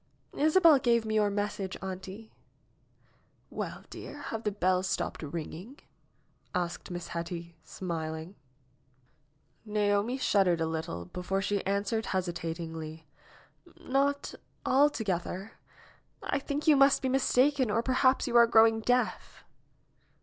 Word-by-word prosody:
^Hsabel 315 -1 +5
gave 235 -3 +2
me 220 - -2
your 210 -1 +3
message, 200 -2 -3
auntie." 190 +3 -7 1.2
''Well, - - -5
dear, - - -8 0.2
have 225 0 -4
the 210 - +1
bells 185 -1 +1
stopped - - -2
ringing?" 165 - -7 0.8
asked 175 -1 -3
Miss 175 -1 -6
Hetty, 170 0 -5
smiling. 160 -1 -5 1.3
Naomi 210 +2 0
shuddered 190 -9 +2
a 165 - +1
little 160 - -4
before 180 - -3
she 200 +1 -1
answered 200 +3 0
hesitat 175 -3 -2
ingly, 160 -1 -7 0.8
"Not 280 +2 0 0.3
altogether. 220 -8 +1 0.7
I 280 - -1
think 285 +2 -4
you 305 - +7
must 275 0 +5
be - - +1
mistaken 265 0 +2
or 225 +3 +1
perhaps 255 +1 +3
you 240 - -3
are 235 0 +8
growing 225 0 +5
deaf." 245 +2 -1
205 Hz, 120 wpm, -30 LUFS, 175-250 Hz, 1.3 s, are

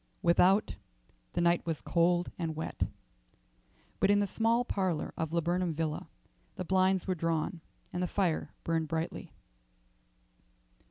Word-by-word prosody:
Without, 185 +4 +4 0.6
the - - 0
night 170 0 +3
was 165 -3 -2
cold 175 +1 +2
and 165 -2 -2
wet, 160 - -2 1.1
but - - +3
in 205 0 +5
the 205 - +2
small 230 +4 +1
parlour 185 -9 -1
of 160 -1 -2
Laburnam 170 0 0
Villa 155 -1 -2 0.5
the - - -4
blinds 190 0 +3
were 185 - +1
drawn 165 0 -1 0.3
and 175 - -2
the 180 - +1
fire 180 -3 0
burned 165 -1 0
brightly. 160 +1 -3
175 Hz, 130 wpm, -31 LUFS, 165-190 Hz, 1.1 s, in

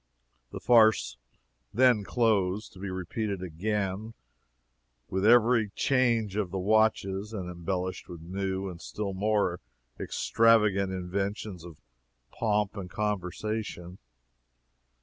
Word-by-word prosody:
The - - -7
farce 110 - +4 0.5
then 125 -3 +4
closed, 105 -1 0
to 95 - -14
be 100 0 -5
repeated 95 +2 -3
again 100 +4 -3 0.9
with 95 +1 -1
every 115 0 +5
change 115 -6 +1
of 105 -4 -1
the 95 - -4
watches, 105 0 +1
and 95 -4 -4
embellished 90 +1 -4
with 85 - -8
new 95 +2 -3
and 85 -3 -8
still 100 -2 -4
more 100 -3 0 0.4
extravagant 105 -4 +2
inventions 95 0 -4
of 85 -3 -12 0.5
pomp 105 -2 0
and 95 -3 -6
conversation. 105 -2 -4
100 Hz, 110 wpm, -28 LUFS, 95-110 Hz, 0.9 s, every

